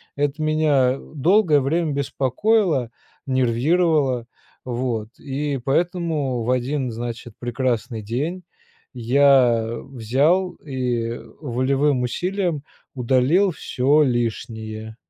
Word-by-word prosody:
Это 145 +1 -1
меня 145 -4 +2 0.2
долгое 160 0 +4
время 155 +3 0
беспокоило, 140 - +1 0.3
нервировало, 130 +1 +1 0.4
вот 120 -3 -2
и 140 0 -3
поэтому 155 -5 0
в 120 - 0
один 130 +1 -1
значит 115 0 -6
прекрасный 120 -2 -2
день 150 - -3 0.5
я 125 -2 +4
взял 140 - +1
и 125 -4 -2 0.2
волевым 135 0 +1
усилием 175 +4 -1 0.3
удалил 130 +10 +2
всё 145 0 +2
лишнее. 110 -3 -3
135 Hz, 85 wpm, -22 LUFS, 120-150 Hz, 0.5 s, долгое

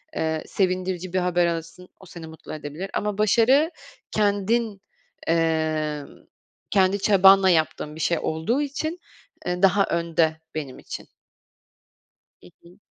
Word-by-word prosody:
eee, 160 -1 -1
sevindirici 185 -1 -1
bir 185 - +2
haber 175 -1 +2
alırsın, 170 +2 -5
o 190 - -15
seni 170 -2 -10
mutlu 160 0 -10
edebilir 155 +5 -6
ama 210 -1 -2
başarı 245 - +4 0.4
kendin, 210 0 0 0.5
emm, 160 -2 0 0.6
kendi 195 -1 +3
çabanla 195 -1 +6
yaptığın 155 -2 0
bir - - -10
şey 170 -2 +1
olduğu 160 - -1
için, 310 +4 -3 0.5
eee, 180 0 -2
daha 200 +1 +5
önde 165 -1 0 0.2
benim 140 -5 -5
için. - - -8 1.4
Hı 90 - -14
hı. 175 +3 -18
180 Hz, 125 wpm, -24 LUFS, 160-200 Hz, 1.4 s, çabanla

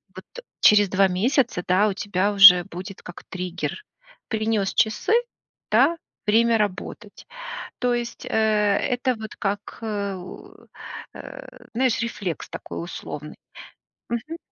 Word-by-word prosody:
вот. - - -10
Э, - - -10 0.2
через 205 -2 +6
2 195 +1 +4
месяца, 215 +1 +1
да, 190 +4 +4
у 200 - 0
тебя 200 0 -1
уже 195 -3 +9
будет 190 +1 -9
как 175 - -11
триггер. 180 - -4 0.4
Принёс 220 -3 0
часы, 220 - +1 0.6
да, 275 +10 +4 0.3
время 230 +2 +4
работать. 205 +1 -4 0.5
То 245 -1 +1
есть, 240 -1 -4
э, - - -7
это 220 +4 +1
вот 220 -1 -8
как, 205 +1 -4
э, 200 -3 -3 1.0
э, - - -11
знаешь, 250 -1 +1
рефлекс 205 -7 -4
такой - - -7
условный. 150 -3 -7 0.7
Мгм. 270 +8 -4
210 Hz, 125 wpm, -23 LUFS, 190-235 Hz, 1.0 s, уже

